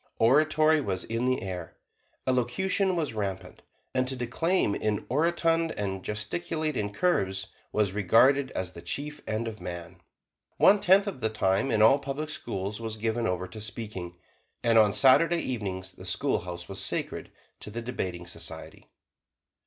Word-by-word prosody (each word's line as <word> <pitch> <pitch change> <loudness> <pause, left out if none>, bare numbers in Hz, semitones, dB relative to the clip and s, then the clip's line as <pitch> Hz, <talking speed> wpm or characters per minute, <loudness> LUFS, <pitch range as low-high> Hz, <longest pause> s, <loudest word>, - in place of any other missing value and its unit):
Oratory 155 +5 +4
was 95 -8 -2
in 115 +2 -2
the 130 -4 0
air; 90 -4 -6 0.5
elocution 180 - +1
was 155 -8 -1
rampant; 100 -3 -4 0.3
and 130 0 +1
to 130 - +2
declaim 125 - 0
in 105 0 -1
orotund, 165 +2 +2
and 95 -2 -3
gesticulate 155 +9 -2
in 105 -3 -2
curves, 95 - 0 0.2
was 105 -3 +1
regarded 125 +8 +4
as 90 -1 -3
the 85 - -10
chief 145 - -4
end 110 +1 -2
of 110 -3 -7
man. 85 0 -7 0.6
One 205 +1 +6
tenth 195 +2 +5
of 200 -10 -5
the 110 -2 0
time 100 +2 +1
in 110 -3 +3
all 135 +6 +6
public 140 +3 -4
schools 100 -7 -4
was 110 -1 -4
given 115 +1 -1
over 90 -1 -2
to 110 - -8
speaking, 105 -5 -5 0.5
and 115 -1 +5
on 105 -2 +5
Saturday 165 +9 +5
evenings 95 -7 -4
the - - -12
schoolhouse 85 0 -2
was 95 - -6
sacred - - -3 0.3
to - - -8
the 115 +2 -5
Debating 90 -8 -4
Society. 85 -2 -8
110 Hz, 155 wpm, -28 LUFS, 95-145 Hz, 0.6 s, One